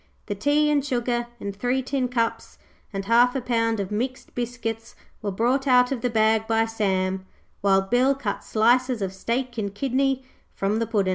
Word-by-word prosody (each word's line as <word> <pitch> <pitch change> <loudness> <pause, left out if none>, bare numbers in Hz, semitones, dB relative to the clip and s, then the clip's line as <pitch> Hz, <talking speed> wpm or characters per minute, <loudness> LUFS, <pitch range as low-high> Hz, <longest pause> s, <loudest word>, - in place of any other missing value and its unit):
The 205 - -3
tea 290 +8 +2
and 290 -2 +2
sugar 240 -3 -1
and 200 -1 -5
three 245 +5 0
tin 260 -1 -1
cups 230 -2 -2 0.3
and 195 -1 -4
half 240 +4 +4
a - - +1
pound 230 -3 0
of 195 -1 -3
mixed 250 +5 -3
biscuits 235 -2 -4 0.3
were 210 - -2
brought 245 +8 0
out 250 0 +5
of 260 -4 -2
the 245 - 0
bag 220 -1 +2
by 225 0 +2
Sam, 190 -4 -1 0.3
while 195 -1 +4
Bill 250 +7 +2
cut 245 -7 -4
slices 240 +1 +2
of 190 -1 -3
steak 240 +4 -2
and 200 -1 -3
kidney 270 +2 0 0.3
from 200 +3 0
the 230 - -1
Puddin'. 200 -4 +1
230 Hz, 185 wpm, -24 LUFS, 210-255 Hz, 0.3 s, out